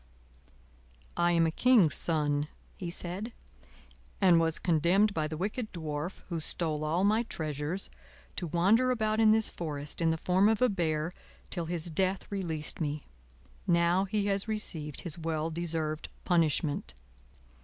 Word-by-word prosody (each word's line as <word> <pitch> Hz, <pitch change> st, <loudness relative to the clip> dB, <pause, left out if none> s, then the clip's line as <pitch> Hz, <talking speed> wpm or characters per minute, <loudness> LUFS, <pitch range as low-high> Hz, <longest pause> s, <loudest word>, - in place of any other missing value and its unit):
"I 175 Hz, 0 st, +3 dB
am 165 Hz, -1 st, +4 dB
a 160 Hz, -, +1 dB
king's 215 Hz, -, +4 dB
son," 150 Hz, -1 st, 0 dB, 0.3 s
he 175 Hz, -, -5 dB
said, 185 Hz, +6 st, -5 dB, 0.9 s
"and 180 Hz, -4 st, +6 dB
was 165 Hz, -1 st, +1 dB
condemned 180 Hz, +5 st, +3 dB
by 155 Hz, -3 st, 0 dB
the 155 Hz, 0 st, -5 dB
wicked 215 Hz, +6 st, -3 dB
Dwarf, 160 Hz, 0 st, -5 dB
who 170 Hz, -2 st, -2 dB
stole 155 Hz, -1 st, -2 dB
all 165 Hz, +5 st, +1 dB
my 215 Hz, +3 st, +4 dB
treasures, 155 Hz, -3 st, -4 dB, 0.5 s
to 175 Hz, -, -2 dB
wander 195 Hz, +10 st, +3 dB
about 220 Hz, -3 st, +1 dB
in 220 Hz, -1 st, +6 dB
this 220 Hz, 0 st, +2 dB
forest, 150 Hz, -2 st, -3 dB
in 165 Hz, -, +3 dB
the 160 Hz, -, +1 dB
form 185 Hz, +5 st, +3 dB
of 220 Hz, -, +2 dB
a 250 Hz, 0 st, +4 dB
bear, 165 Hz, -3 st, -1 dB, 0.4 s
till 170 Hz, -3 st, -2 dB
his 170 Hz, 0 st, -2 dB
death 185 Hz, +4 st, +1 dB
released 170 Hz, -6 st, -3 dB
me. 150 Hz, -1 st, -2 dB, 0.6 s
Now 170 Hz, +2 st, +3 dB
he 200 Hz, +1 st, -1 dB
has 200 Hz, +1 st, +1 dB
received 165 Hz, -9 st, -3 dB
his 170 Hz, -1 st, -1 dB
well 160 Hz, 0 st, -2 dB
deserved 160 Hz, -2 st, -3 dB, 0.2 s
punishment." 155 Hz, -, +1 dB
170 Hz, 150 wpm, -30 LUFS, 155-195 Hz, 0.9 s, and